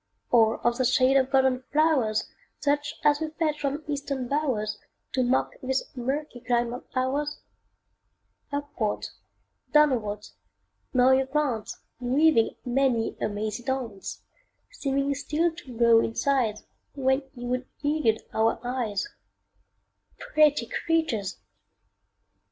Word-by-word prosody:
Or 225 -2 +5
of 240 +1 +2
the - - +3
shade 255 +2 +4
of 265 -1 +4
golden 265 -1 +3
flowers, 290 -8 +2 0.3
Such 290 +1 0
as 295 0 +4
we 315 - -1
fetch 305 -2 0
from 285 +2 -2
Eastern 280 -3 -3
bowers, 255 -7 -1 0.3
To 260 - +2
mock 255 +1 +2
this 265 +1 -2
murky 265 +2 -3
clime 240 0 0
of 250 - -7
ours? 280 +4 -1 1.1
Upwards, 285 -7 -3 0.6
downwards, 230 -9 +2 0.6
now 255 0 +5
ye 265 0 +4
glance, 265 -5 -1 0.2
Weaving 255 0 +3
many 250 -2 +1
a - - +1
mazy 215 +2 -3
dance; 240 -6 -4 0.5
Seeming 275 - 0
still 315 +4 0
to 265 -8 -11
grow 235 -1 +6
in 225 0 -1
size 250 -7 +1 0.3
When 265 0 +2
ye 245 -1 -7
would 250 +1 -2 0.2
elude 290 -7 +1
our 225 +1 +2
eyes 245 - -2 1.1
Pretty 305 - +3
creatures! 280 - -1
260 Hz, 120 wpm, -26 LUFS, 235-290 Hz, 1.1 s, grow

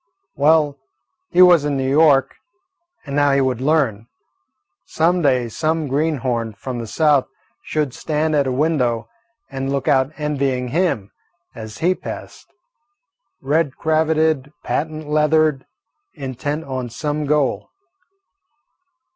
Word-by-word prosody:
Well, 145 -1 +3 0.5
he 180 - +6
was 175 -4 +6
in 145 -1 -1
New 130 0 -1
York, 140 -1 +4 0.7
and 140 -1 -5
now 145 -1 +3
he 140 - +3
would 130 -2 -1
learn. 130 -7 +1 0.8
Some 175 +3 +1
day 130 -5 +2
some 155 +5 -1
greenhorn 130 -6 -1
from 125 +4 -6
the 115 - -5
South 145 +1 +2 0.4
should 150 -4 -2
stand 155 +1 -1
at 140 -2 +2
a - - 0
window 125 -5 0 0.4
and 135 0 -3
look 140 -1 -2
out 135 0 +3
envying 135 -4 -1
him, 150 - -1 0.4
as 110 -1 -9
he 185 - +4
passed, - - -9 0.9
red 145 0 0
cravated, 155 -2 +1
patent 155 0 -3
leathered, 150 -2 +2 0.5
intent 145 +2 -4
on 130 -4 -5
some 145 +5 -3
goal. 145 -3 0
145 Hz, 120 wpm, -20 LUFS, 130-155 Hz, 0.9 s, he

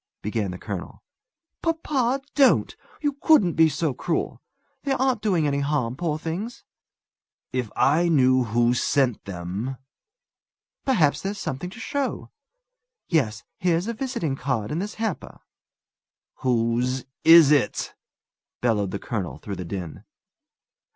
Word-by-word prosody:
began 105 -1 -1
the 90 - -5
colonel. 100 -2 -7 0.6
"Papa, 275 -6 0
don't! 275 -3 +4 0.3
You 290 -1 +1
couldn't 235 - +5
be 160 -1 +5
so 155 -2 -1
cruel! 165 +6 -2 0.4
They 275 - 0
aren't 265 -1 +1
doing 185 -8 +1
any 140 -1 +1
harm, 140 -4 0
poor 155 0 -1
things!" 195 +11 -5 0.9
"If 125 -4 -1
I 165 +5 +3
knew 130 -4 +4
who 120 +2 +2
sent 125 -1 +1
them 100 +8 -4 0.5
" - - -59
"Perhaps 170 - +3
there's 200 +1 -3
something 145 +3 -4
to 205 - -12
show. 280 +3 -3 0.8
Yes; 115 -10 +1 0.2
here's 175 -2 +1
a 235 - -2
visiting 235 - -2
card 125 -6 -2
in 155 - -1
this 205 +3 -4
hamper." 220 -6 -4 1.0
"Whose 125 +1 0 0.2
is 165 -3 +8
it?" 140 -8 +1 0.7
bellowed 105 -5 +1
the 100 - -3
colonel 100 -3 -4
through 100 -3 -6
the 90 - -5
din. 85 -2 -6
145 Hz, 130 wpm, -24 LUFS, -, 1.0 s, is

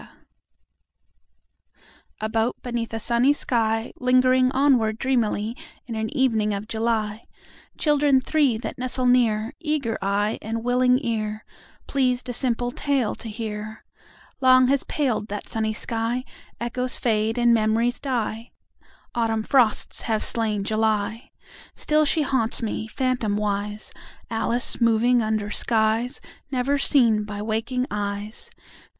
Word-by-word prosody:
A 215 - -2
boat 225 +2 0
beneath 240 -2 -3
a 225 - -3
sunny 240 +5 +3
sky, 225 -4 -1
Lingering 255 0 +4
onward 255 -6 +2
dreamily 230 -3 0 0.3
In 235 - -6
an 220 0 -2
evening 220 -6 +2
of 200 +2 -6
July— 220 -1 -1 0.5
Children 290 -3 +3
three 275 -3 +2
that 240 - -6
nestle 255 0 -1
near, 235 -2 +2
Eager 300 -8 -1
eye 200 +2 0
and 225 +1 -4
willing 250 +1 +3
ear, 215 -2 -2 0.4
Pleased 255 -2 0
a - - -2
simple 245 0 -1
tale 270 -4 0
to 225 - -7
hear— 215 0 -6 0.6
Long 255 -1 +6
has 275 -1 +2
paled 250 -8 -1
that 205 0 -6
sunny 220 -1 -1
sky: 230 +3 -2 0.3
Echoes 250 +1 0
fade 220 -1 0
and 240 -1 +4
memories 230 +2 +1
die. 235 -3 -3 0.6
Autumn 225 -2 0
frosts 240 -4 +2
have 220 -1 +1
slain 215 -3 0
July. 220 +2 -1 0.5
Still 305 0 +2
she 305 +1 +2
haunts 255 -4 0
me, 220 0 -3
phantomwise, 210 -4 -2 0.4
Alice 230 +2 -1
moving 235 +2 +4
under 215 -1 -1
skies 225 +4 +1 0.3
Never 275 +2 0
seen 230 -7 +3
by 205 -1 -6
waking 225 +4 -1
eyes. 205 - -4
230 Hz, 125 wpm, -24 LUFS, 215-255 Hz, 0.6 s, Long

